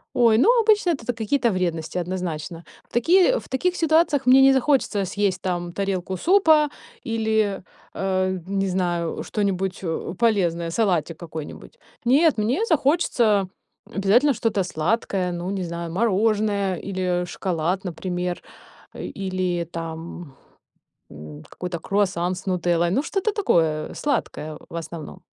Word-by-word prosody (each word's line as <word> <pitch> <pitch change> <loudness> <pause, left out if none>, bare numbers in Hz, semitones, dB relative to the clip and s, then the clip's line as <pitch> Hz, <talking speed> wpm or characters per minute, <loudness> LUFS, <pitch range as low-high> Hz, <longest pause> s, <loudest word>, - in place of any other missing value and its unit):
Ой, 230 -3 +5
ну, 415 - +5
обычно 425 -4 +3
это 275 -8 -4
та 245 - -1
какие-то 235 +2 0
вредности, 175 -3 -2
однозначно. 170 -2 -4 0.3
В - - -40
такие 360 - +4
в - - -14
таких 355 +7 0
ситуациях 315 -4 +2
мне 260 +1 +7
не 270 0 +7
захочется 260 -7 +1
съесть 195 -1 -1
там 175 -2 -2
тарелку 190 -1 -2
супа 320 - +4 0.3
или, 220 -3 0 0.3
а, 185 -1 0 0.2
не 195 0 0
знаю, 175 -3 -1
что-нибудь, 195 -3 -2
э, 165 0 -3
полезное, 175 -7 +1
салатик 170 -6 0
какой-нибудь. 160 - -9 0.3
Нет, 285 +2 +4
мне 250 - +1
захочется 255 - +2 0.4
обязательно 230 +9 +3
что-то 215 -4 0
сладкое, 180 +1 -1
ну, 175 +2 -4
не 195 -2 -2
знаю, 170 -1 -5
мороженое 205 -1 +1
или 180 -1 -2
шоколад, 180 +1 -2
например, 180 0 -3 0.5
э, - - -8
или 185 -3 -2
там, 165 -2 -7 0.8
м, 75 0 -10
какой-то 180 -2 -5
круассан 185 -2 0
с 185 - -10
нутеллой. 175 -2 +1
Ну, 255 - +2
что-то 395 +5 -1
такое 160 - +1
сладкое 155 - -3
в - - -9
основном. 170 +1 -7
190 Hz, 130 wpm, -23 LUFS, 175-235 Hz, 0.8 s, мне